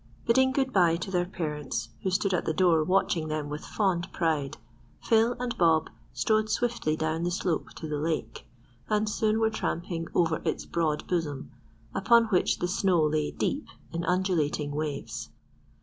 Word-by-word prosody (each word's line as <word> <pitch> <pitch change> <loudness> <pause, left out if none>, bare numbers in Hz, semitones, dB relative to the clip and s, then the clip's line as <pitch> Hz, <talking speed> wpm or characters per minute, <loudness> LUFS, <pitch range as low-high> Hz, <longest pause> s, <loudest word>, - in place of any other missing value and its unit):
Bidding 260 +3 +4
good 265 0 0
bye 175 -4 +4
to 180 +3 -5
their 175 -1 +1
parents, 150 -10 -4
who 190 - 0
stood 190 +1 +1
at 180 - 0
the 160 - -1
door 165 -2 +4
watching 175 -2 +1
them 155 -1 -3
with 150 +1 -5
fond 185 -5 -1
pride, 155 -5 -1 0.4
Phil 230 +1 +3
and 245 -1 -2
Bob 160 -2 +3 0.2
strode 215 0 +1
swiftly 230 -9 0
down 160 +1 -1
the 175 - 0
slope 175 -2 -1
to 160 - -6
the 150 -1 -2
lake, 160 +1 -3 0.4
and 215 0 +1
soon 215 +1 +1
were 220 0 +2
tramping 170 -5 -3
over 165 -2 +2
its - - -2
broad 155 -3 -1
bosom, 150 -6 -2 0.4
upon 230 +4 +5
which 185 -4 +2
the 175 - -1
snow 180 -3 +2
lay 150 0 +1
deep 290 - -2 0.3
in 170 0 -2
undulating 170 -5 0
waves. 150 0 -4
175 Hz, 165 wpm, -28 LUFS, 155-205 Hz, 0.4 s, upon